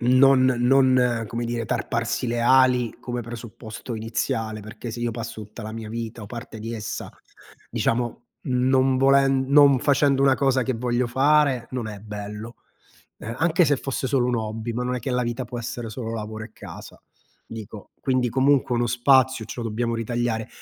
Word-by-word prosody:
non 130 +2 +5
non, 125 -2 +3
come 120 +3 -3
dire, 115 -1 -3
tarparsi 125 - -1
le 120 0 -1
ali 125 -1 +4
come 120 -1 -4
presupposto 115 0 -8
iniziale, 110 0 -2
perché 110 +3 -8
se 115 +2 -6
io 120 0 0
passo 115 -1 -6
tutta 105 +3 -11
la 110 +1 -6
mia 110 -1 -6
vita 115 0 -5
o - - -8
parte 115 0 -8
di 115 +2 -5
essa, 110 0 -5 0.6
diciamo, 120 +1 -1 0.2
non 130 +1 +2
volen 135 0 +4
non 140 -1 +6
facendo 140 0 +3
una 135 -1 +5
cosa 135 -2 +2
che 130 - -1
voglio 120 +1 0
fare, 135 -1 +3
non 125 -3 -3
è 105 -2 -7
bello. 105 +2 -7 0.6
Eh, 115 - -6
anche 170 +3 +3
se 145 -1 +2
fosse 135 0 -3
solo 125 -2 +1
un 125 - +1
hobby, 110 +1 -3
ma 125 +2 -2
non 125 0 -1
è - - -3
che 130 - -4
la 125 0 +1
vita 120 +2 -3
può 120 +1 -6
essere 120 0 -5
solo 115 +1 -5
lavoro 110 0 -5
e 110 - -15
casa, - - -11 0.4
dico. 110 -2 -9
Quindi 130 -2 +1
comunque 135 0 +2
uno 120 0 +1
spazio 130 +1 +3
ce 120 - -6
lo 115 - -2
dobbiamo 115 +2 -1
ritagliare. 115 -1 -2
120 Hz, 185 wpm, -24 LUFS, 115-130 Hz, 0.6 s, non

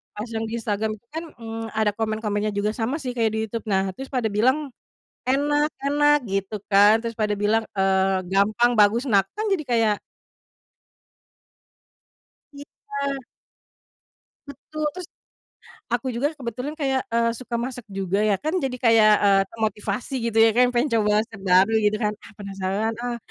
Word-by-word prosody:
pas 210 +3 -5
yang 225 0 -2
di 230 - -3
Instagram 215 0 -1
itu 235 - -34
kan, 320 +1 -4
mmm, 225 -1 -6
ada 215 -1 +2
komen-komennya 215 -1 -1
juga 205 +1 0
sama 245 +5 -1
sih 255 -3 -3
kayak 225 -2 +2
di - - -1
YouTube 230 +2 -5
nah 190 -1 +1
terus 270 +4 -8
pada 250 -4 +1
bilang, 260 +8 +1 0.6
enak 290 +3 +2
enak 295 +1 +4
gitu 195 +2 -2
kan 205 +2 +6
terus 230 -1 -4
pada 210 -1 +1
bilang, 215 +2 +2
eee, 190 -1 +2
gampang 215 +5 +3
bagus 215 +4 +4
nah 200 -2 +5
kan 430 +1 -2
jadi 340 -6 0
kayak 225 -4 +2 2.6
Iya. 280 -1 -5 1.3
Betul 300 +2 -5
terus, 365 -2 -7 0.8
aku 240 +1 -2
juga 275 +6 -1
kebetulan 255 +1 -5
kayak, 270 -4 0
eee, 230 0 +3
suka 245 -2 -7
masak 245 0 -4
juga 195 -1 -2
ya 210 - +3
kan 315 +4 0
jadi 270 -6 -2
kayak, 225 -3 +5
eee, 195 -1 +5
termotivasi 215 +2 -3 0.2
gitu 225 - -8
ya 225 - +6
kayak 245 +2 +3
pengen 245 +4 +1
coba 210 0 +3
resep 220 -3 -12
baru 185 +4 +5
gitu 210 0 +2
kan, 210 0 +1
ah, - - -15
penasaran, 200 +2 -3
ah, 240 0 -3
225 Hz, 160 wpm, -23 LUFS, 210-255 Hz, 2.6 s, kan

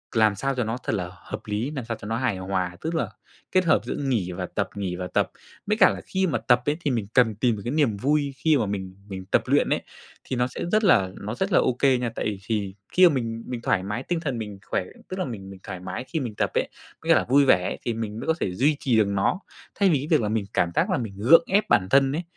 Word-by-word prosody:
làm 110 -2 +4
sao 135 +6 -1
cho 125 - 0
nó 115 +2 -2
thật - - -1
là 90 -3 -3
hợp 90 - -8
lý, 105 +5 -2
làm 135 -6 -5
sao 115 -2 -4
cho 105 - -7
nó 115 +1 -1
hài 125 -7 0
hòa, 95 -1 -2
tức 165 +1 -2
là 160 - 0 0.4
kết 185 -1 +3
hợp 160 - +4
giữa - - -3
nghỉ 120 -10 -1
và 85 - -4
tập, - - -2
nghỉ 95 -3 -3
và 90 0 -4
tập. - - 0 0.3
Với 210 +1 0
cả 190 -5 +7
là - - -4
khi 190 0 0
mà 145 -8 0
tập 120 +2 +3
ấy 150 +1 0
thì 150 -4 -1
mình 115 -5 -1
cần 115 -4 +4
tìm 115 +1 +1
được 100 - -7
cái 120 - -1
niềm 140 -9 +2
vui 140 +3 +1
khi 155 0 +3
mà 115 - +1
mình 95 -2 -4
mình 95 -2 -7
tập 95 - +2
luyện - - +2
ấy, - - +1 0.4
thì 130 - -4
nó 125 +1 +1
sẽ 125 - -8
rất 215 +1 +3
là 100 - +4
nó 105 +4 -5
rất 190 +7 -1
là - - +5
ô 130 - +2
kê 130 0 +3
nha. 125 -1 -1
Tại - - -3
vì 105 -2 -2
thì 100 -4 -2 0.2
khi 185 0 +7
mà - - -1
mình 115 -2 -3
mình 120 -2 -4
thoải 95 -5 +1
mái 105 +6 -3
tinh 175 +2 -1
thần, 140 -7 -3
mình 105 -3 -6
khỏe, 95 - -1 0.3
tức 185 - -5
là 185 - 0
mình 100 -7 -7
mình 95 - -11
thoải 95 -3 -6
mái 95 +7 -5
khi 160 +5 -3
mình 120 -7 -4
tập - - 0
ấy, - - 0 0.3
có - - -12
nghĩa - - +7
là - - +3
vui 140 +3 +4
vẻ 90 -8 +4
ấy - - -3
thì 120 - -2
mình 110 -1 -4
mới - - -6
có 160 - +4
thể 90 - -1
duy 145 +8 +3
trì 120 -4 +2
được 105 - +4
nó, 100 - +1 0.4
thay 200 -2 +3
vì 155 - +4
cái 145 - -5
việc 155 -4 +3
là 105 - -1
mình 110 -2 -1
cảm 85 - +1
giác - - +2
là - - +1
mình 110 -5 -4
gượng 155 +11 +6
ép 200 +2 +2
bản 95 -2 +3
thân 135 +3 +4
ấy. 165 +5 -2
115 Hz, 300 wpm, -25 LUFS, 100-145 Hz, 0.4 s, cả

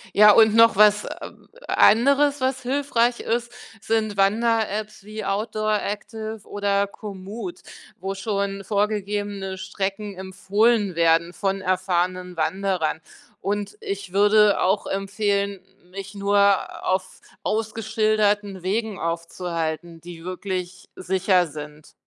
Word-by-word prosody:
Ja 210 0 +8
und 220 -1 +6
noch 230 -1 +6
was, 210 0 +5
äh, - - -7 0.4
anderes, 280 +5 +4
was 260 0 -1
hilfreich 245 -2 +1
ist, 240 +1 -2 0.3
sind 220 -2 -1
Wanderapps 215 0 0
wie 215 +1 -6
'Outdooractive' 215 +1 -2
oder 200 0 0
'Komoot', 205 - -8 0.4
wo 195 +1 -3
schon 195 -1 -2
vorgegebene 205 -2 -2
Strecken 195 +1 -4
empfohlen 200 +2 +1
werden 165 +1 +3
von 195 +1 -2
erfahrenen 185 -1 -1
Wanderern. 175 -1 -1 0.4
Und 205 - -3
ich 400 - -5
würde 205 +1 +5
auch 195 +3 +1
empfehlen, 200 0 -1 0.3
mich 195 +1 -8
nur 200 0 +2
auf 185 0 -1 0.2
ausgeschilderten 215 -2 0
Wegen 210 +2 -2
aufzuhalten, 165 -1 -4
die 170 0 -11
wirklich 185 0 -5
sicher 185 -1 +2
sind. 150 0 -10
200 Hz, 105 wpm, -23 LUFS, 185-215 Hz, 0.4 s, Ja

